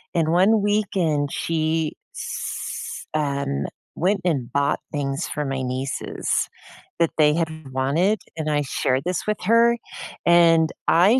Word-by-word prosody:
and 165 -2 +2
one 200 +5 +4
weekend, 185 -9 +1
she's 160 -1 -3
um, 140 - -1 0.3
went 190 +3 +1
and 135 -8 0
bought 140 +1 +1
things 140 +1 -2
for 150 - -3
my 135 -1 -2
nieces 130 +1 -2 0.5
that 165 - +3
they 150 -1 +5
had 165 0 0 0.2
wanted, 160 +11 +1 0.2
and 155 -1 -2
I 145 0 +2
shared 130 0 0
this 180 -1 -1
with 210 - +1
her, 230 +4 +5 0.5
and 165 -2 +5 0.2
I 195 +9 +5
160 Hz, 130 wpm, -23 LUFS, 140-180 Hz, 0.5 s, they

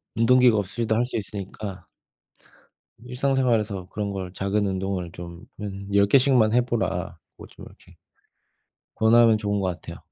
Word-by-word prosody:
운동기구가 120 -1 +4
없이도 110 +3 -2
할 120 +2 +1
수 125 - -4
있으니까 100 -1 -7 1.2
일상생활에서 125 -7 0
그런 105 -1 -4
걸 95 -2 -5
"작은 100 +2 -1
운동을 95 -2 -3
좀 85 0 -10
한 100 -1 -6
10 100 0 +5
개씩만 125 -4 +4
해 125 - +4
보라."고 120 -1 -4
좀 - - -13
이렇게 - - -18 1.0
권하면 115 0 +5
좋은 105 -1 -2
것 95 - -1
같아요. 90 -3 -6
105 Hz, 295 characters per minute, -24 LUFS, 95-120 Hz, 1.2 s, 10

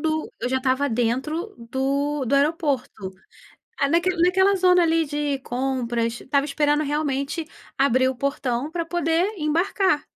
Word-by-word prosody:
do 315 0 -2
eu 245 - -1
já 260 +1 +1
estava 260 +2 +1
dentro 265 - -1
do 275 +4 -1
do 250 - 0
aeroporto. 275 - 0 0.7
Ah, 280 - +3
naque 335 +4 +2
naquela 380 +3 +4
zona 360 -1 +4
ali, 325 -1 +2
de 290 -1 -2
compras, 240 -3 -2
estava 280 +1 +1
esperando, 295 +1 +1
realmente, 295 +2 -2 0.3
abrir 260 -1 +3
o 260 - -4
portão 270 0 -2
pra 335 0 -3
poder 345 +4 0
embarcar, 320 0 +1
285 Hz, 140 wpm, -23 LUFS, 260-325 Hz, 0.7 s, naquela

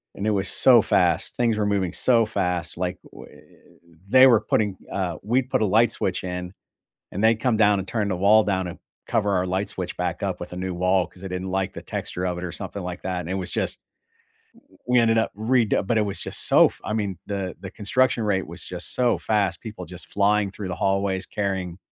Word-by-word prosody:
And 100 - -3
it - - +3
was 95 -3 0
so - - +6
fast; - - +1
things 115 -3 +2
were 105 - +1
moving 100 -4 0
so 115 -3 +3
fast. 90 -7 -2
Like, 90 +1 -2
whe - - -13 0.8
they 130 +3 +8
were 115 -4 +5
putting 105 -3 0
uh, 90 -4 -2
we'd 125 +4 0
put - - +1
a - - +3
light 110 +4 +4
switch 95 -4 -2
in, 90 0 -5 0.6
and 100 +4 -2
they'd 110 0 +5
come 115 +1 +1
down 105 -2 +4
and 95 0 -5
turn 105 -3 -1
the 95 - -1
wall 105 +4 +5
down 95 -2 0
and 85 - -8 0.3
cover 105 -3 +1
our 90 0 +1
light 95 +3 -2
switch 90 -2 -5
back 90 -1 -3
up 95 -3 -2
with 90 - -7
a - - -6
new 90 0 -3
wall 90 +1 +2
'cause 90 - -18
they 95 - -5
didn't 90 +1 -4
like 95 0 -1
the - - -8
texture 90 +1 -4
of 90 -1 -2
it 90 - -5
or 90 - -5
something 100 0 -6
like 90 0 -6
that, 90 -1 -2
and 85 0 -6
it - - -1
was 95 -2 -4
just - - -2 0.9
w - - -24
we 125 0 +4
ended 115 -1 +3
up 115 - +1
redo 110 -1 +1
but 115 +3 +1
it - - +4
was 100 - -3
just - - -4
so - - +7
f - - -12
I 110 - -3
mean, 100 -5 -2
the 100 -3 -3
the 95 - -6
construction 115 +3 +1
rate 95 -3 0
was 85 +2 -8
just 90 -1 -6
so 125 -1 +2
fast. 100 -5 0
People 105 -5 -8
just 90 0 -11
flying 100 0 +2
through 100 -1 -6
the - - -3
hallways 95 -1 0
carrying 95 -4 -3
100 Hz, 235 wpm, -24 LUFS, 90-110 Hz, 0.9 s, they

